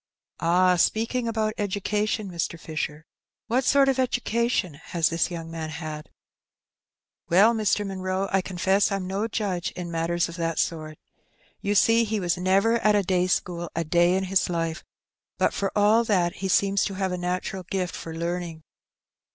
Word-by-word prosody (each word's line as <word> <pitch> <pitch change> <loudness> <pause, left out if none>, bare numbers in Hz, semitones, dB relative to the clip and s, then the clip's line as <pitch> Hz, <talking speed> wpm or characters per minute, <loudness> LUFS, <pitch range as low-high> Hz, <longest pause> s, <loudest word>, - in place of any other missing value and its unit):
"Ah, 180 +2 +3
speaking 230 +6 +1
about 220 -1 0
education, 210 +1 -1
Mr. 170 -1 -3
Fisher, 155 -1 -5 0.4
what 245 +4 +1
sort 275 +1 +4
of 270 -1 +1
education 235 - 0
has 165 +3 -1
this 165 +2 0
young 165 -2 -6
man 160 -1 -5
had? 155 -1 -7 0.4
" - - -68
" - - -51
Well, 200 +7 +6
Mr. 210 -2 +1
Munroe, 190 0 -2
I 195 - +3
confess 190 +3 +1
I'm 195 -2 -2
no 195 +4 -2
judge 190 -5 -2
in 175 -1 -6
matters 170 +1 0
of 170 +1 -9
that 165 -1 -2
sort. 155 -2 -2 0.6
You 205 +1 -1
see, 230 +3 +5
he 220 -1 -1
was 175 -3 0
never 195 +6 +2
at 215 -2 +3
a 205 - +3
day 180 -1 +1
school 175 -2 -1
a 165 - 0
day 175 +3 +3
in 190 - 0
his 190 -1 +1
life; 165 -1 -2 0.5
but - - +2
for 195 -1 -1
all 210 +3 +5
that 180 -5 +1
he 195 - -3
seems 195 +1 +2
to 195 - -4
have 190 -1 -1
a - - -1
natural 180 +1 -3
gift 180 -1 -3
for 165 -1 -7
learning. 170 -1 -4
185 Hz, 175 wpm, -25 LUFS, 170-205 Hz, 0.6 s, Well